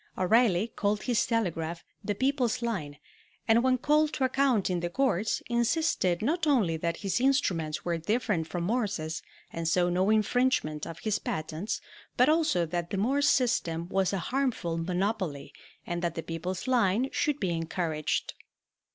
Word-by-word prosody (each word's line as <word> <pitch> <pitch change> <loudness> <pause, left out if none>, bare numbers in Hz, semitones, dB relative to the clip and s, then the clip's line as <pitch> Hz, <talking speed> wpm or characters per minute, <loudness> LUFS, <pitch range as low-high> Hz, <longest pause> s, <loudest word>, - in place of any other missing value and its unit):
O'Reilly 215 +1 +3
called 205 0 0
his 245 -4 +1
telegraph 170 -7 -1 0.2
"The 205 - -1
People's 255 -1 0
Line," 165 -12 -3 0.5
and 225 +1 +5
when 255 0 +3
called 300 +4 +2
to 270 - -1
account 260 -5 +2
in 180 -2 0
the 175 0 -2
courts 225 -2 0
insisted 235 - +1
not 325 +6 0
only 220 - +3
that 170 +1 -2
his 195 +5 0
instruments 175 - +1
were 170 -1 -1
different 210 -3 0
from 175 0 -3
Morse's, 195 -7 -1 0.3
and 165 0 -3
so 175 +2 +2
no 185 +3 +2
infringement 215 - +1
of 165 - -7
his 210 -2 0
patents, 160 +6 -3 0.4
but - - +5
also 305 - +2
that 170 +1 -3
the 195 - -3
Morse 275 +8 +2
system 170 -10 +1
was 190 -1 +1
a 195 - -1 0.2
harmful 250 -11 0
monopoly 180 -2 -2 0.3
and 175 0 -3
that 170 -2 -2
"The 165 - -4
People's 180 +4 -4
Line" 240 -1 +2
should 295 -1 0
be 185 -3 0
encouraged. 165 -2 -2
195 Hz, 160 wpm, -29 LUFS, 170-245 Hz, 0.5 s, and